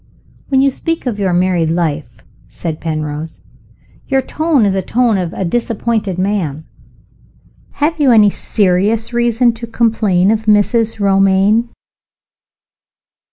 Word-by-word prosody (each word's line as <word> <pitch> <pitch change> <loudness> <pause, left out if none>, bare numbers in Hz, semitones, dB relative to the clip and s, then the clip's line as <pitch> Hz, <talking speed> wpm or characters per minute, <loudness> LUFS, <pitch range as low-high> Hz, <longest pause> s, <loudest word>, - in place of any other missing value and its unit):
"When 265 -1 +3
you 275 0 +3
speak 330 +4 -4
of 230 -5 -3
your 195 -2 0
married 175 -2 +1
life," 160 -3 -3 0.3
said 160 -2 -6
Penrose, 155 -1 -5 0.7
"your 270 -1 +1
tone 310 -5 +1
is 195 - +1
the 190 - -1
tone 230 +1 +1
of 175 -2 -3
a 190 - -4
disappointed 220 -1 -2
man. 185 -6 -2 1.1
Have 310 +2 -1
you 285 -3 +3
any 210 -3 +5
serious 210 +5 0
reason 240 0 +2
to 230 +1 -8
complain 215 -5 +1
of 220 0 -2
Mrs. 215 +2 +2
Romayne?" 195 +3 +2
210 Hz, 125 wpm, -15 LUFS, 180-235 Hz, 1.1 s, any